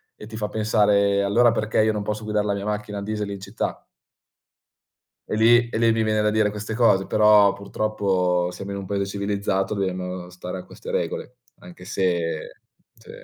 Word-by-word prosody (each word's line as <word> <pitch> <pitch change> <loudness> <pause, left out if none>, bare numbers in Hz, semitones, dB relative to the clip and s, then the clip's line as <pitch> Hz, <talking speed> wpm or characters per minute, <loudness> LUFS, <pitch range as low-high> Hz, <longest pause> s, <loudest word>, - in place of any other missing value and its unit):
e 105 - -11
ti 110 0 -8
fa 105 -1 -2
pensare: 105 -2 +2
"Allora 115 +4 +4
perché 110 -1 0
io 110 - +3
non 105 -1 -3
posso 105 +1 -4
guidar 105 -1 -1
la 100 - 0
mia 100 0 -4
macchina 105 -1 -3
a - - -6
diesel 105 0 -3
in 100 - -6
città?" 100 +3 -4 1.5
E - - -2
lì 120 +1 +5
e - - -3
lì 115 0 +3
mi 110 0 +1
viene 110 -1 +1
da 105 - +2
dire 110 -1 +2
queste 105 +1 -5
cose, 105 -5 +3
però 105 -2 +5
purtroppo 95 -3 0
siamo 100 +2 -7
in 100 - -4
un 100 - -6
paese 100 0 -1
civilizzato, 100 0 -1
dobbiamo 90 -2 -3
stare 90 +1 -7
a 90 - -9
queste - - -9
regole, 125 - -3 0.2
anche 90 0 -13
se 85 -4 -2 0.3
sì. - - -20
100 Hz, 190 wpm, -23 LUFS, 95-110 Hz, 1.5 s, lì